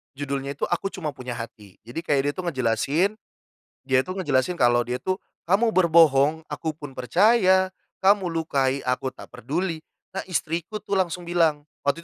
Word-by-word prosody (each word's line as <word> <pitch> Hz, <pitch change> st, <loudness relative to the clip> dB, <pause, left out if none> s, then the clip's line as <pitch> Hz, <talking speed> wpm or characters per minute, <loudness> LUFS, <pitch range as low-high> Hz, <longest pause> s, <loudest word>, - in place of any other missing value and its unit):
Judulnya 140 Hz, 0 st, -3 dB
itu -, -, -2 dB
Aku 195 Hz, -, -1 dB
Cuma 155 Hz, -6 st, -5 dB
Punya 125 Hz, -1 st, -6 dB
Hati. 105 Hz, -4 st, -9 dB
Jadi 145 Hz, +8 st, -5 dB
kayak 145 Hz, -4 st, +2 dB
dia -, -, +2 dB
itu 185 Hz, -, -4 dB
ngejelasin 145 Hz, -, +1 dB, 0.7 s
dia 130 Hz, 0 st, +2 dB
itu 185 Hz, -, -4 dB
ngejelasin 150 Hz, -4 st, +1 dB
kalau 120 Hz, 0 st, +4 dB
dia 125 Hz, +1 st, -3 dB
itu, 185 Hz, +4 st, -1 dB, 0.2 s
kamu 215 Hz, +6 st, +2 dB
berbohong, 160 Hz, -3 st, +4 dB
aku 160 Hz, -, -4 dB
pun 145 Hz, -3 st, -9 dB
percaya, 190 Hz, -, +3 dB, 0.2 s
kamu 195 Hz, -1 st, +3 dB
lukai, 140 Hz, -5 st, 0 dB
aku 125 Hz, +1 st, 0 dB
tak -, -, -12 dB
peduli. 165 Hz, +1 st, -3 dB, 0.3 s
Nah 195 Hz, -, -2 dB
istriku, 170 Hz, +4 st, -2 dB
tuh, 200 Hz, -, -6 dB
langsung 180 Hz, -2 st, 0 dB
bilang. 165 Hz, -4 st, +1 dB, 0.2 s
Waktu 140 Hz, +3 st, +1 dB
160 Hz, 165 wpm, -24 LUFS, 135-185 Hz, 0.7 s, kalau